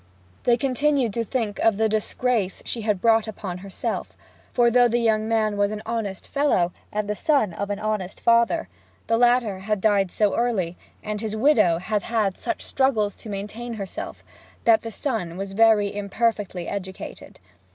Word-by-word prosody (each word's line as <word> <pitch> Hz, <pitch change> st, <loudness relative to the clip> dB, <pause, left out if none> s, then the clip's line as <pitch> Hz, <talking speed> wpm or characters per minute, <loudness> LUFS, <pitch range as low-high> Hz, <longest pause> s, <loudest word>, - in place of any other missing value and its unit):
They 240 Hz, -1 st, +4 dB
continued 275 Hz, -2 st, +1 dB
to 230 Hz, -, 0 dB
think 225 Hz, -3 st, -2 dB
of 225 Hz, -3 st, +3 dB
the 220 Hz, 0 st, +3 dB
disgrace 215 Hz, -1 st, -1 dB
she 235 Hz, -, -3 dB
had 210 Hz, -4 st, 0 dB
brought 225 Hz, -1 st, +4 dB
upon 190 Hz, -4 st, -6 dB
herself; 195 Hz, 0 st, -4 dB, 0.3 s
for, 240 Hz, -1 st, +3 dB
though 245 Hz, 0 st, +5 dB
the 240 Hz, 0 st, +1 dB
young 220 Hz, -2 st, +1 dB
man 215 Hz, -2 st, +1 dB
was 205 Hz, 0 st, +2 dB
an 215 Hz, 0 st, -5 dB
honest 220 Hz, -4 st, -3 dB
fellow, 280 Hz, -12 st, +2 dB, 0.2 s
and 210 Hz, 0 st, -2 dB
the 210 Hz, -, -1 dB
son 220 Hz, -, +2 dB
of 200 Hz, +3 st, -4 dB
an 205 Hz, -, -1 dB
honest 210 Hz, -3 st, -3 dB
father, 235 Hz, +7 st, +3 dB, 0.4 s
the 230 Hz, -, +2 dB
latter 240 Hz, -4 st, +3 dB
had 210 Hz, +2 st, -1 dB
died 200 Hz, -2 st, +2 dB
so 210 Hz, +2 st, +1 dB
early, 200 Hz, -8 st, 0 dB, 0.3 s
and 210 Hz, 0 st, -3 dB
his 220 Hz, -1 st, -3 dB
widow 220 Hz, -, +4 dB
had 205 Hz, +4 st, -1 dB
had 215 Hz, -5 st, 0 dB
such 345 Hz, -, -4 dB
struggles 225 Hz, -7 st, +1 dB
to 220 Hz, -, -10 dB
maintain 210 Hz, +4 st, -5 dB
herself; 195 Hz, -3 st, -6 dB, 0.4 s
that 225 Hz, -1 st, +5 dB
the 230 Hz, -, -5 dB
son 215 Hz, -, -3 dB
was 195 Hz, 0 st, -5 dB
very 215 Hz, -1 st, +4 dB
imperfectly 205 Hz, -2 st, -1 dB
educated. 190 Hz, -2 st, -7 dB
215 Hz, 170 wpm, -24 LUFS, 200-235 Hz, 0.4 s, though